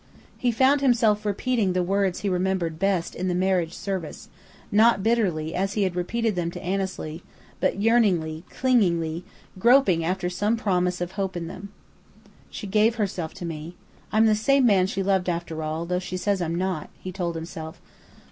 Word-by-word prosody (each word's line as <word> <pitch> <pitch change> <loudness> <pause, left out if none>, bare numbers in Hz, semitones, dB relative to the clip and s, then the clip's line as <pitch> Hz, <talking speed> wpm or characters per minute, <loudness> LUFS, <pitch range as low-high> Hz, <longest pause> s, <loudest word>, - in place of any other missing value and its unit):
He 245 - 0
found 265 +4 +3
himself 225 -5 +3
repeating 210 -1 0
the 180 0 +1
words 195 0 0
he 205 - -2
remembered 180 -3 -1
best 190 -3 0
in 185 - -3
the 180 - 0
marriage 180 -2 +1
service, 190 -6 -5 0.4
not 215 -1 +4
bitterly 185 -9 +1
as 195 +2 -1
he 210 - +1
had 185 -2 -1
repeated 220 +4 -1
them 170 -1 -1
to - - -8
Annesley, 185 -4 -3 0.4
but - - 0
yearningly, 190 -8 +2
clingingly, 175 -10 +1 0.4
groping 235 -7 +4
after 180 +2 -1
some 205 +5 0
promise 180 -5 0
of 175 0 -3
hope 190 -2 -3
in 170 - -4
them. 190 +4 -8 0.8
"She - - -7
gave 215 +3 +3
herself 190 -7 -3
to 185 -2 -6
me. 165 +1 -6 0.4
I'm 220 +1 +4
the 220 - +5
same 265 +5 +3
man 190 -5 +4
she 195 -1 -2
loved, 190 -2 +1
after 170 -2 -3
all, 155 +2 -3
though 180 +1 -1
she 180 0 -5
says 195 0 0
I'm 165 -1 -1
not," 180 -3 -2
he 185 - -7
told 175 -2 -3
himself. 160 -1 -7
185 Hz, 175 wpm, -25 LUFS, 175-210 Hz, 0.8 s, the